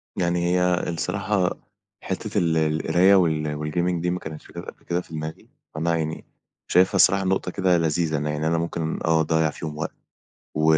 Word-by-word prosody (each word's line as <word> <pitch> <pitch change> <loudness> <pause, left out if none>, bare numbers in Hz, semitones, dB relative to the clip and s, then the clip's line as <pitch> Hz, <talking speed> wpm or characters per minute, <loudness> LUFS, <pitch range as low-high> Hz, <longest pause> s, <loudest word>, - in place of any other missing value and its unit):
يعني 85 -1 0
هي 90 -1 +2
الصراحة 95 +3 -1 0.5
حتّة 105 +3 -3
ال 85 -3 +2
القراية 80 +5 +3
وال 75 -5 +1
والgaming 85 +3 -1
دي 90 - 0
ما 90 +1 -1
كانتش 80 -1 -9
جات - - -8
قَبل - - -11
كده 85 +1 -1
في 85 - -15
دماغي، 80 0 -6 0.3
فأنا 85 +2 +1
يعني 80 0 -3 0.4
شايفها 95 +2 +4
الصراحة 95 +1 +5
نقطة 95 -1 0
كده 90 -1 +2
لذيذة 80 -1 +1
إن 75 - -3
يعني 75 +1 -1
أنا 85 0 +2
ممكن 85 -1 -2
آه 80 -1 +3
أضيَّع 80 -1 +2
فيهم 75 0 -6
وقت - - -3 0.6
و 75 - 0
85 Hz, 180 wpm, -24 LUFS, 80-90 Hz, 0.6 s, الصراحة